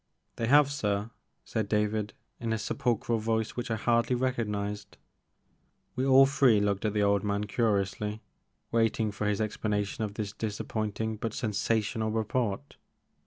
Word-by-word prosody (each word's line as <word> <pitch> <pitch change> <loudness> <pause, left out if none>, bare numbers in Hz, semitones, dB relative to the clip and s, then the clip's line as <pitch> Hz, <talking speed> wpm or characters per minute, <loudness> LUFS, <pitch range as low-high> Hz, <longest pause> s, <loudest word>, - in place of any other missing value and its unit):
They 115 - -1
have, 140 +2 +6
sir," 105 -5 -1 0.3
said 110 -2 -2
David 105 -1 0 0.3
in 115 -1 -1
a - - 0
sepulchral 115 +1 0
voice 110 0 0
which 120 -1 -4
I 110 - +1
hardly 115 +3 +2
recognized. 105 -5 -2 1.0
We 130 +1 0
all 135 0 +8
three 135 -5 +4
looked 100 0 0
at 105 - 0
the 105 - +3
old 100 -1 +2
man 100 0 0
curiously, 105 -1 -1 0.5
waiting 115 -1 +1
for 105 +1 -3
his 105 -1 0
explanation 105 -1 -1
of 105 -1 -4
this 105 -2 -4
disappointing 110 0 -3
but 110 +1 -4
sensational 110 0 0
report. 110 +3 -2
110 Hz, 145 wpm, -29 LUFS, 105-115 Hz, 1.0 s, all